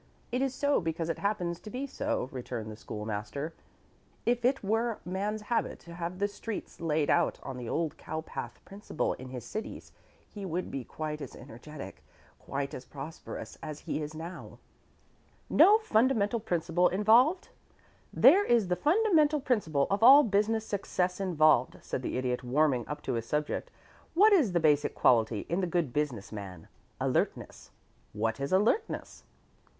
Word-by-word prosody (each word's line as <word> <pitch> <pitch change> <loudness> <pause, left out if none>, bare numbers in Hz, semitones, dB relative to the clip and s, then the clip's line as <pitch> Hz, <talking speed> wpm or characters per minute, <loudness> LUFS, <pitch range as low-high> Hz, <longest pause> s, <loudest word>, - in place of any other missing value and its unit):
It 250 +2 0
is 270 -1 0
so 285 -3 +2
because 165 0 -2
it 165 - -2
happens 180 -5 -1
to 215 - -10
be 255 +5 -4
so," 255 - -2
returned 120 -4 -5
the - - -8
School 105 -1 -7
master. 110 +9 -4 0.7
"If 240 0 +1
it 260 0 +2
were 225 +2 0
man's 205 +4 -2
habit 230 +2 -1
to 170 - -11
have 170 +1 -5
the 200 +1 +1
streets 205 -1 -7
laid 155 -2 +1
out - - +2
on 135 - -6
the 125 -2 -6
old 160 -1 -1
cowpath 160 0 -6
principle 195 -5 -3
in 130 0 -9
his 125 -2 -7
cities 215 - -6 0.4
he 205 - -9
would 180 -1 -3
be 135 - -4
quite 150 +3 -5
as - - -7
energetic, 140 +6 -10 0.4
quite 140 +1 -4
as 130 - -6
prosperous, 140 +5 -8
as 155 -2 -7
he - - -3
is 150 +1 -6
now." 165 +3 -8 0.9
"No 420 +2 +7
fundamental 230 - +2
principle 175 -3 +1
involved? 230 - +4 0.6
There 400 +3 +6
is 235 - +2
the 180 - +2
fundamental 310 - +3
principle 165 - +1
of 200 - +1
all 275 +5 +9
business 215 +1 +1
success 185 -3 -1
involved," 155 -9 +3
said - - -3
the 125 - -3
Idiot, 125 -1 -1
warming 130 -1 +1
up 150 0 -6
to 130 - -2
his 115 -1 -3
subject. 150 +2 -2 0.5
"What 420 +4 +6
is 275 - +4
the 175 - +3
basic 150 -2 +2
quality 110 -3 +3
in 175 +3 0
the 180 - 0
good 170 -7 -1
business 140 -9 -2
man? 100 -4 -8 0.3
Alertness. - - -2 0.4
What 115 +3 -1
is 140 0 -3
'alertness?' 215 - 0
170 Hz, 165 wpm, -30 LUFS, 140-220 Hz, 0.9 s, all